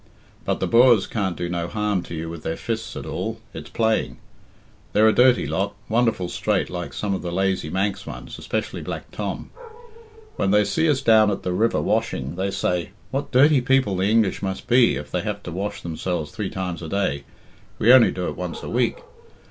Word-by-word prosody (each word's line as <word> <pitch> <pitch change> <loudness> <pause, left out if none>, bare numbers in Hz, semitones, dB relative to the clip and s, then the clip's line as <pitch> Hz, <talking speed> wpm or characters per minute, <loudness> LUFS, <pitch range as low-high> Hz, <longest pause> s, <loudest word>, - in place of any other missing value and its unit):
But - - 0
the - - 0
Boers 120 -3 +5
can't 95 -5 -2
do 90 - -2
no 85 -1 -2
harm 105 -1 -1
to 85 - -7
you 80 +1 -4
with 85 -1 -7
their 80 - -3
fists 110 -1 -4
at - - -6
all 110 +1 -4
it's - - -8
playing. 110 - 0 0.8
They're 110 +1 +5
a 110 - +5
dirty 125 0 +5
lot, 100 +1 -2
wonderful 115 -5 +1
straight - - -1
like - - -5
some 100 -2 -2
of 95 - -2
the 85 - -4
lazy 95 -3 0
Manx 95 +2 -2
ones, - - -8
especially - - -3
Black - - -6
Tom. - - -5 0.9
When - - +1
they 105 +1 +5
see 160 +11 +1
us 135 -3 +2
down 110 -4 +5
at 100 - -3
the 90 - -1
river 110 +5 +2
washing, 65 +4 -1
they 95 +2 -1
say, 90 -2 -1 0.2
'What 140 +1 -2
dirty 140 +1 +5
people 130 -5 +2
the 95 +2 +1
English 110 -3 +2
must 95 -1 -4
be 120 0 +4
if 75 - -7
they 90 - 0
have 100 0 -4
to 85 - -6
wash 105 +4 -4
themselves 85 -1 -3
three 105 -3 -4
times 90 -2 -4
a 80 - -6
day 85 -8 -1 0.5
we 120 +3 +6
only 130 -3 +7
do 90 -1 -3
it - - -4
once 90 -2 -5
a - - -5
week.' - - 0
100 Hz, 205 wpm, -23 LUFS, 90-115 Hz, 0.9 s, only